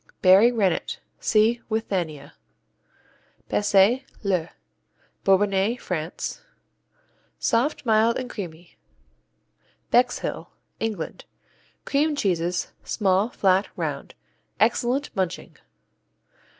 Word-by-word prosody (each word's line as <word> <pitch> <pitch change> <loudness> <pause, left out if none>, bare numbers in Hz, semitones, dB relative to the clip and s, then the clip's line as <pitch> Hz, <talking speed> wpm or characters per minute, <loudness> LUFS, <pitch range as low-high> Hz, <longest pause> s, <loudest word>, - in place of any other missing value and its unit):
Berry 195 +6 +7
Rennet 225 - 0 0.2
see 225 +2 +2
Withania. 185 -10 -3 1.2
Bessay, 205 +5 +4 0.2
le 185 -5 0 0.7
Bourbonnais, 195 +3 +2
France 165 -2 -4 1.0
Soft, 255 +5 0
mild, 225 0 +3
and 255 - -4
creamy. 175 -7 -9 1.1
Bexhill 250 +1 +1 0.3
England 215 -8 -4 0.6
Cream 295 +2 +1
cheeses, 180 - -1
small, 195 +1 +1
flat, 195 -4 +2
round. - - -4 0.4
Excellent 260 +4 +1
munching. 185 -1 -3
205 Hz, 75 wpm, -24 LUFS, 185-235 Hz, 1.2 s, Berry